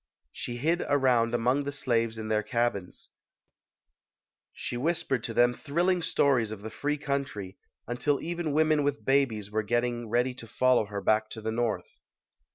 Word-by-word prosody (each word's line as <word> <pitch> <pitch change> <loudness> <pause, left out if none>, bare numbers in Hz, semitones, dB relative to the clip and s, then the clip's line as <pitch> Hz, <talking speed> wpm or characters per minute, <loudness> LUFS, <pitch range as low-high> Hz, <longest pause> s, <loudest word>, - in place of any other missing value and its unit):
She 120 - -5
hid 165 +7 +1
around 125 -4 +3
among 125 +4 +2
the 145 - -3
slaves 115 -5 0
in 110 -1 -5
their 110 -1 +1
cabins. 105 -4 -2 1.4
She - - -5
whispered 135 -3 0
to 115 - -4
them 120 0 +5
thrilling 175 +7 0
stories 135 -8 +2
of 105 -2 -7
the 110 - -6
free 145 +5 -1
country, 135 -10 -4 0.3
until 135 +4 0
even 170 -2 -3
women 155 0 +3
with 145 0 -1
babies 120 -7 +1
were 110 +1 +1
get 120 +3 +1
ting 120 -2 -3
ready 125 +3 +1
to 115 -2 -11
follow 125 0 +3
her 100 -1 -5
back 110 +1 +2
to 110 - -7
the 110 +1 -2
North. 115 -1 -2
120 Hz, 165 wpm, -28 LUFS, 110-140 Hz, 1.4 s, them